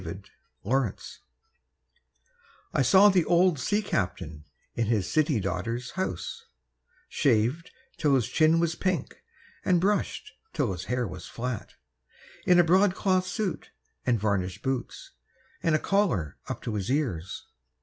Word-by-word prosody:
OLD -, -, -8 dB, 0.3 s
BOATS 120 Hz, 0 st, -2 dB, 1.5 s
I -, -, +2 dB
saw 190 Hz, +11 st, +7 dB
the 185 Hz, -3 st, +3 dB
old 175 Hz, -3 st, +3 dB
sea 205 Hz, +10 st, 0 dB
captain 85 Hz, -, -3 dB, 0.3 s
in 115 Hz, -2 st, -1 dB
his 105 Hz, -5 st, +1 dB
city 155 Hz, -5 st, +2 dB
daughter's 105 Hz, +7 st, -3 dB
house, 95 Hz, -2 st, -4 dB, 0.6 s
Shaved 130 Hz, +7 st, +1 dB, 0.3 s
till 145 Hz, -3 st, +3 dB
his 120 Hz, -4 st, +1 dB
chin 160 Hz, +5 st, +3 dB
was 170 Hz, -1 st, +1 dB
pink, 185 Hz, -3 st, -2 dB, 0.5 s
and 180 Hz, -2 st, +3 dB
brushed 200 Hz, +4 st, -1 dB, 0.2 s
till 120 Hz, -, 0 dB
his 90 Hz, 0 st, -5 dB
hair 125 Hz, +1 st, -1 dB
was 90 Hz, -1 st, -8 dB
flat, 120 Hz, -2 st, -5 dB, 0.7 s
In 180 Hz, -, +6 dB
a 175 Hz, -, +7 dB
broadcloth 185 Hz, +1 st, +3 dB
suit 185 Hz, +1 st, -3 dB, 0.3 s
and 120 Hz, -3 st, +1 dB
varnished 95 Hz, -3 st, -1 dB
boots 130 Hz, -2 st, -4 dB, 0.5 s
and 165 Hz, -2 st, +2 dB
a -, -, +2 dB
collar 165 Hz, -, 0 dB
up -, -, -5 dB
to 115 Hz, -, -3 dB
his 100 Hz, -1 st, -3 dB
ears. 120 Hz, -, -2 dB
130 Hz, 135 wpm, -27 LUFS, -, 1.5 s, saw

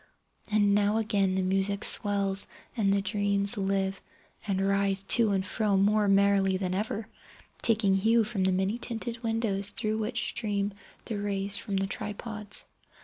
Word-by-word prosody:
And 205 Hz, -1 st, +3 dB
now 205 Hz, +1 st, +2 dB
again 205 Hz, -4 st, +1 dB
the 190 Hz, -, 0 dB
music 195 Hz, +2 st, 0 dB
swells, 200 Hz, -1 st, +2 dB, 0.3 s
and 200 Hz, -4 st, +1 dB
the 200 Hz, 0 st, +1 dB
dreams 200 Hz, +1 st, +2 dB
live, 195 Hz, -1 st, -1 dB, 0.5 s
and 195 Hz, -2 st, 0 dB
writhe 195 Hz, 0 st, 0 dB
to 230 Hz, -3 st, +5 dB
and 190 Hz, -2 st, 0 dB
fro 205 Hz, 0 st, +1 dB
more 205 Hz, +2 st, +3 dB
merrily 195 Hz, -1 st, +3 dB
than 185 Hz, -1 st, -2 dB
ever, 210 Hz, +2 st, -3 dB, 0.5 s
taking 215 Hz, -4 st, +2 dB
hue 225 Hz, +4 st, +3 dB
from 210 Hz, -3 st, -2 dB
the 190 Hz, -, +3 dB
many 190 Hz, +5 st, 0 dB
tinted 235 Hz, -1 st, -5 dB
windows 225 Hz, -4 st, 0 dB
through 215 Hz, 0 st, -2 dB
which 225 Hz, +2 st, -1 dB
stream 205 Hz, -2 st, -2 dB, 0.3 s
the 215 Hz, -3 st, -4 dB
rays 200 Hz, 0 st, -1 dB
from 200 Hz, -4 st, -3 dB
the 195 Hz, -, 0 dB
tripods. 210 Hz, +1 st, -6 dB
200 Hz, 155 wpm, -28 LUFS, 195-215 Hz, 0.5 s, to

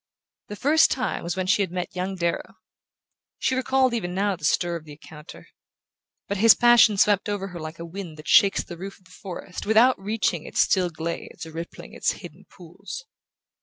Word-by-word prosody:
The 210 Hz, -, -7 dB
first 300 Hz, +8 st, +4 dB
time 255 Hz, -1 st, -2 dB
was 170 Hz, +1 st, -3 dB
when 185 Hz, -1 st, -2 dB
she 200 Hz, +2 st, +2 dB
had 190 Hz, -, 0 dB
met 180 Hz, 0 st, -5 dB
young 185 Hz, +1 st, -3 dB
Darrow. 170 Hz, -2 st, -2 dB, 0.8 s
She -, -, 0 dB
recalled 260 Hz, 0 st, +2 dB
even 180 Hz, -6 st, -3 dB
now 200 Hz, 0 st, +1 dB
the 165 Hz, -, -18 dB
stir 175 Hz, +2 st, +1 dB
of 165 Hz, -, -6 dB
the 150 Hz, -1 st, -12 dB
encounter. 150 Hz, 0 st, -13 dB, 0.8 s
But 200 Hz, -, -2 dB
his 225 Hz, +3 st, +7 dB
passion 240 Hz, -3 st, +5 dB
swept 205 Hz, 0 st, +3 dB
over 200 Hz, -1 st, -3 dB
her 175 Hz, -1 st, -8 dB
like 155 Hz, +1 st, -7 dB
a 170 Hz, -, -7 dB
wind 170 Hz, -2 st, -8 dB
that 150 Hz, -, -12 dB
shakes 200 Hz, -3 st, +5 dB
the 175 Hz, -, -10 dB
roof 195 Hz, +2 st, -7 dB
of 185 Hz, -, -29 dB
the 180 Hz, -, -20 dB
forest 180 Hz, +1 st, -8 dB
without 225 Hz, +3 st, +5 dB
reaching 200 Hz, -5 st, -1 dB
its -, -, -5 dB
still 185 Hz, -2 st, +2 dB
glades 165 Hz, 0 st, -6 dB
or 160 Hz, -, -10 dB
rippling 165 Hz, +2 st, -8 dB
its -, -, 0 dB
hidden -, -, -12 dB
pools. -, -, -10 dB
190 Hz, 200 wpm, -24 LUFS, 170-210 Hz, 0.8 s, his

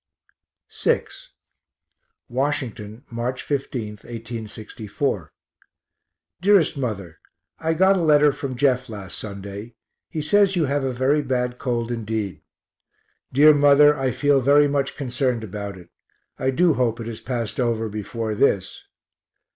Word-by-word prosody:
VI -, -, +2 dB, 1.2 s
Washington, 120 Hz, -4 st, -3 dB
March 120 Hz, +2 st, -3 dB
15, 130 Hz, -6 st, -3 dB
1861. 110 Hz, -, -5 dB, 1.1 s
DEAREST 190 Hz, -5 st, +4 dB
MOTHER 100 Hz, -, -4 dB, 0.4 s
I 160 Hz, 0 st, 0 dB
got 190 Hz, +3 st, +4 dB
a -, -, 0 dB
letter 150 Hz, -2 st, +5 dB
from 135 Hz, -1 st, -5 dB
Jeff 130 Hz, -1 st, +1 dB
last 100 Hz, -4 st, -7 dB
Sunday 100 Hz, +2 st, -7 dB, 0.3 s
he 155 Hz, -4 st, -4 dB
says 200 Hz, +4 st, +3 dB
you 165 Hz, -3 st, +2 dB
have 140 Hz, 0 st, 0 dB
a 135 Hz, -, 0 dB
very 130 Hz, +4 st, +2 dB
bad 125 Hz, -2 st, -2 dB
cold 120 Hz, -2 st, -2 dB
indeed. 110 Hz, -7 st, -3 dB, 0.9 s
Dear 150 Hz, +4 st, +7 dB
Mother, 145 Hz, +1 st, +6 dB
I 135 Hz, -2 st, 0 dB
feel 145 Hz, +1 st, +2 dB
very 145 Hz, +3 st, +5 dB
much 140 Hz, -1 st, -1 dB
concerned 125 Hz, -3 st, -1 dB
about 100 Hz, -1 st, -6 dB
it; 85 Hz, -2 st, -15 dB, 0.5 s
I 130 Hz, -, +1 dB
do 165 Hz, +5 st, +3 dB
hope 120 Hz, -3 st, 0 dB
it 115 Hz, -, -5 dB
has 115 Hz, -1 st, -6 dB
passed 115 Hz, -3 st, -3 dB
over 115 Hz, -2 st, 0 dB
before 110 Hz, +1 st, -4 dB
this. 100 Hz, -4 st, 0 dB
125 Hz, 130 wpm, -23 LUFS, 110-145 Hz, 1.2 s, Dear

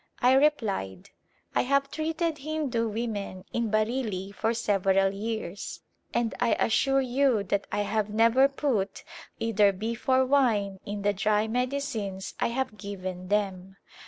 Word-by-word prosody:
I 250 Hz, +1 st, +5 dB
replied, 220 Hz, -, +1 dB, 0.2 s
" -, -, -37 dB
I -, -, +4 dB
have 275 Hz, +2 st, +1 dB
treated 320 Hz, 0 st, -1 dB
Hindu 275 Hz, -6 st, -1 dB
women 205 Hz, -4 st, -4 dB
in 235 Hz, -2 st, 0 dB
Bareilly 215 Hz, -3 st, -1 dB
for 225 Hz, +2 st, 0 dB
several 195 Hz, -4 st, +2 dB
years 205 Hz, -2 st, -5 dB, 0.3 s
and 235 Hz, -2 st, 0 dB
I 240 Hz, -1 st, +3 dB
assure 270 Hz, +4 st, +2 dB
you 255 Hz, -3 st, +2 dB
that 200 Hz, +1 st, -1 dB
I -, -, 0 dB
have 210 Hz, 0 st, -1 dB
never 230 Hz, +5 st, +5 dB
put 255 Hz, -9 st, -1 dB, 0.3 s
either 215 Hz, -3 st, +3 dB
beef 225 Hz, +6 st, -5 dB
or 260 Hz, 0 st, +5 dB
wine 225 Hz, -8 st, +2 dB
in 205 Hz, 0 st, -4 dB
the 205 Hz, 0 st, +2 dB
dry 210 Hz, +2 st, +1 dB
medicines 245 Hz, -5 st, -2 dB
I -, -, +2 dB
have 235 Hz, -3 st, -3 dB
given 185 Hz, -2 st, -6 dB
them." 195 Hz, -2 st, -1 dB
220 Hz, 145 wpm, -27 LUFS, 200-260 Hz, 0.3 s, I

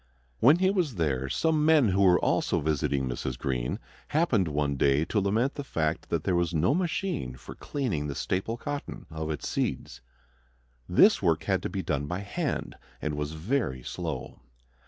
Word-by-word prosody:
When 140 Hz, +8 st, +6 dB
he 190 Hz, +1 st, +3 dB
was 175 Hz, -, 0 dB
there 70 Hz, -6 st, 0 dB
some 155 Hz, -, +1 dB
men 155 Hz, -7 st, +5 dB
who 95 Hz, +1 st, +2 dB
were 90 Hz, -2 st, +6 dB
also -, -, +1 dB
visiting 70 Hz, -3 st, 0 dB
Mrs. 60 Hz, 0 st, -3 dB
Greene 60 Hz, -3 st, -2 dB, 0.3 s
happened 140 Hz, -, +2 dB
one 75 Hz, -2 st, 0 dB
day 70 Hz, +3 st, +3 dB
to 105 Hz, -, 0 dB
lament 110 Hz, +8 st, +1 dB
the 145 Hz, -, -5 dB
fact 80 Hz, -, -2 dB
that -, -, 0 dB
there 95 Hz, -, +1 dB
was 85 Hz, -1 st, 0 dB
no 85 Hz, -, +3 dB
machine 175 Hz, -, -1 dB
for -, -, -10 dB
cleaning 110 Hz, -, -2 dB
the 70 Hz, -, -4 dB
staple 95 Hz, -, -2 dB
cotton 145 Hz, +3 st, -5 dB
of 80 Hz, 0 st, -4 dB
its 75 Hz, -, -3 dB
seeds. -, -, -2 dB, 0.9 s
This -, -, +6 dB
work -, -, +2 dB
had -, -, +1 dB
to -, -, -3 dB
be -, -, -3 dB
done 75 Hz, -1 st, -1 dB
by 90 Hz, +5 st, -3 dB
hand 140 Hz, -, -3 dB, 0.3 s
and 75 Hz, -, -2 dB
was 75 Hz, +1 st, -3 dB
very 80 Hz, -, -1 dB
slow. 80 Hz, -7 st, -5 dB
90 Hz, 175 wpm, -28 LUFS, -, 0.9 s, When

